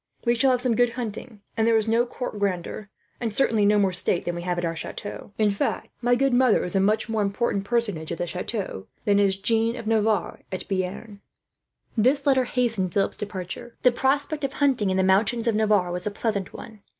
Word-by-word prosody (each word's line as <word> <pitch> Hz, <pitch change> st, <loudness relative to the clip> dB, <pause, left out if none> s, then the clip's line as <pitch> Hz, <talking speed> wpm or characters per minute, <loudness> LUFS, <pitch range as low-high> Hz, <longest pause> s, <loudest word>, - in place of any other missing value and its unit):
We 235 Hz, -, +4 dB
shall 240 Hz, +3 st, +3 dB
have 250 Hz, -1 st, +2 dB
some 250 Hz, -3 st, +1 dB
good 245 Hz, 0 st, +2 dB
hunting, 230 Hz, -2 st, -6 dB
and 225 Hz, 0 st, +1 dB
there 230 Hz, -1 st, +4 dB
is 220 Hz, 0 st, 0 dB
no 230 Hz, +2 st, +2 dB
court 240 Hz, -4 st, -5 dB
grandeur, 195 Hz, +1 st, -3 dB, 0.3 s
and 230 Hz, -2 st, -2 dB
certainly 220 Hz, -2 st, +2 dB
no 210 Hz, +1 st, +4 dB
more 195 Hz, -2 st, +2 dB
state 180 Hz, -1 st, 0 dB
than 175 Hz, -, -1 dB
we 175 Hz, -, -5 dB
have 175 Hz, 0 st, -2 dB
at 175 Hz, -, -1 dB
our 165 Hz, 0 st, -2 dB
chateau. 205 Hz, +5 st, -7 dB
In 215 Hz, -2 st, +3 dB
fact, 200 Hz, -, -2 dB
my 245 Hz, 0 st, +3 dB
good 270 Hz, +1 st, +1 dB
mother 245 Hz, -3 st, +4 dB
is 180 Hz, -, -4 dB
a -, -, +4 dB
much 210 Hz, +3 st, +2 dB
more 220 Hz, -1 st, -1 dB
important 200 Hz, 0 st, -1 dB
personage, 205 Hz, -9 st, -1 dB
there, 180 Hz, -, -3 dB, 0.2 s
than 205 Hz, -1 st, +3 dB
is 195 Hz, -1 st, +3 dB
Jeanne 225 Hz, +3 st, +2 dB
of 230 Hz, -, -7 dB
Navarre 215 Hz, -3 st, +1 dB
at 185 Hz, -1 st, -5 dB
Bearn." 200 Hz, +2 st, -4 dB, 0.7 s
This 260 Hz, +5 st, +2 dB
letter 265 Hz, -2 st, +3 dB
hastened 230 Hz, -8 st, 0 dB
Philip's 195 Hz, -1 st, +1 dB
departure. 205 Hz, +3 st, -6 dB
The 250 Hz, -, +6 dB
prospect 280 Hz, +4 st, 0 dB
of 275 Hz, -1 st, -1 dB
hunting 265 Hz, -8 st, +2 dB
in 190 Hz, -, 0 dB
the 190 Hz, -, +3 dB
mountains 205 Hz, +5 st, +2 dB
of 230 Hz, -, +3 dB
Navarre 210 Hz, -4 st, +2 dB
was 180 Hz, +3 st, -3 dB
a -, -, +2 dB
pleasant 205 Hz, -2 st, -2 dB
one. 220 Hz, -2 st, -11 dB
215 Hz, 210 wpm, -25 LUFS, 195-240 Hz, 0.7 s, The